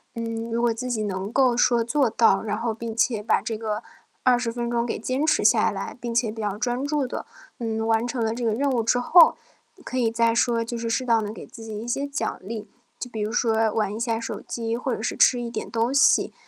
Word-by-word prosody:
嗯， 230 0 -4
如 230 - 0
果 240 -1 +2
自 250 +3 -5
己 225 -3 -1
能 195 0 -3
够 255 -1 +3
说 240 -1 +3
做 255 +2 +1
到， 225 +1 +3
然 210 - -2
后 230 0 -1
并 230 0 -6
且 230 -3 +1
把 - - +2
这 225 - -4
个 215 0 -3 0.4
20 245 -2 +3
分 240 0 -3
钟 235 0 0
给 225 - -3
坚 255 +6 -1
持 - - +2
下 - - +5
来， - - -5
并 235 -1 -4
且 235 -1 +1
比 220 0 -7
较 205 -1 -2
专 245 +3 -1
注 285 -2 0
地， - - -5 0.3
嗯， 225 -1 -2
完 225 +1 +2
成 245 -1 -2
了 220 - 0
这 240 +1 -5
个 225 - +2
任 280 +5 0
务 245 -4 +1
之 245 +2 +2
后， 330 +7 +6 0.5
可 255 - -4
以 235 -3 +2
再 230 0 +2
说 235 -1 +2
就 230 +1 -4
是 230 0 -3
适 255 +3 0
当 230 -2 +3
能 210 - -4
给 220 - -9
自 225 - -12
己 215 -1 -6
一 230 - -7
些 275 +4 -1
奖 285 +2 -3
励， 215 +2 -6 0.3
就 250 - -5
比 220 -3 -5
如 210 +1 -2
说 225 -2 +2
玩 210 -2 -1
一 220 - -5
下 230 -1 -1
手 230 - -5
机， 230 -1 -3
或 250 +1 -2
者 - - -4
是 - - -2
吃 250 - +4
一 240 -1 -4
点 - - -5
东 235 +2 0
西， 280 - +4
230 Hz, 270 characters per minute, -24 LUFS, 225-245 Hz, 0.5 s, 后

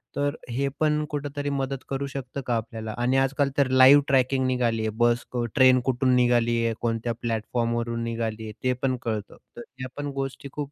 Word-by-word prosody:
तर 145 +1 0
हे 135 +4 -1
पण 150 -1 +2
कुठेतरी 145 0 -3
मदत 135 -1 -3
करू 135 0 -2
शकतं 135 0 -6
का 120 - 0
आपल्याला? 110 -1 -5
आणि 125 +2 +1
आजकाल 135 +1 +1
तर 140 -2 +4
लाईव्ह 130 +2 +8
ट्रॅकिंग 130 0 +2
निघाली 120 -3 0
आहे 110 - 0
बस 120 0 +3
क 120 -1 -1
ट्रेन 130 -2 +6
कुठून 130 0 +2
निघाली 120 -1 +3
आहे, 115 - +1
कोणत्या 115 0 -1
प्लॅटफॉर्मवरून 115 0 -1
निघाली 115 -1 -3
आहे, 110 - -6
ते 130 0 +2
पण 130 -1 +2
कळतं. 110 -3 -4 0.2
तर - - -6 0.2
या 130 - -3
पण 145 0 -3
गोष्टी 135 +1 -6
खूप 145 -1 -5
125 Hz, 190 wpm, -25 LUFS, 115-135 Hz, 0.2 s, लाईव्ह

